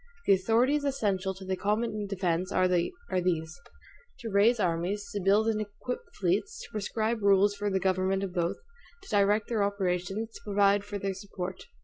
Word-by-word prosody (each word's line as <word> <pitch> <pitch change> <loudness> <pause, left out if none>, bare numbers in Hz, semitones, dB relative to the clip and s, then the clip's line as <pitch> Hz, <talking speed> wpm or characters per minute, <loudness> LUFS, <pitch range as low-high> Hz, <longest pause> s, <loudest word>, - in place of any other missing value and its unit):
The - - +6
authorities 235 +9 +2
essential 200 -9 0
to 190 0 -10
the 190 0 -1
common 210 +1 -1
defense 185 -2 -1
are 185 -1 +3
these: 175 - -1 0.6
to 230 -4 -5
raise 215 +4 +4
armies; 185 +3 -1
to 205 - -2
build 200 +4 +3
and 215 -1 +1
equip 215 +4 -5 0.2
fleets; 200 - 0
to - - -12
prescribe 220 +2 -1
rules 200 0 +4
for 205 0 -2
the 190 -1 +1
government 190 +1 +1
of 190 -2 -4
both; 175 -2 0 0.5
to - - -14
direct 205 +1 +2
their 225 -3 0
operations; 200 +2 -1
to - - -11
provide 200 -1 +3
for 205 0 -5
their 195 0 -2
support. 190 -1 -6
200 Hz, 170 wpm, -29 LUFS, 185-215 Hz, 0.6 s, The